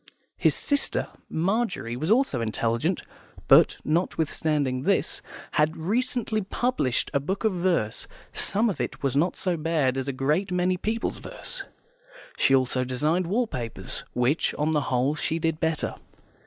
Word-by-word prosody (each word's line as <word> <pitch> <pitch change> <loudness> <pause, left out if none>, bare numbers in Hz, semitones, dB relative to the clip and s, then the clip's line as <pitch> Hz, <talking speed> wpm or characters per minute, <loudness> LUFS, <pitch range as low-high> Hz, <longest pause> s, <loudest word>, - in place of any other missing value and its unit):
His - - +3
sister 285 -1 +1 0.2
Margery 185 - -1
was 155 +7 -3
also 240 - +3
intelligent, 115 - 0 0.4
but, - - +6
notwithstanding 155 -4 0
this, - - 0 0.3
had 150 +2 +2
recently 220 +4 0
published 200 - 0
a 140 - +3
book 190 +10 -3
of 220 -3 +2
verse; 175 - 0 0.3
some 215 +4 +1
of 200 - -1
it - - -4
was 135 -1 0
not 165 +6 +2
so 180 -2 -1
bad 150 -5 +1
as 130 - -3
a - - 0
great 150 +9 0
many 180 0 +2
people's 220 +5 -2
verse. - - -4 0.7
She 135 - +4
also 130 -1 +1
designed 150 +8 0
wall 230 +7 +1
papers, 125 - -5
which 125 +6 +1
on 150 +1 0
the 150 -2 +2
whole 130 +3 +2
she 160 +1 -1
did 165 -1 -1
better. 160 -1 0
160 Hz, 150 wpm, -26 LUFS, 135-190 Hz, 0.7 s, but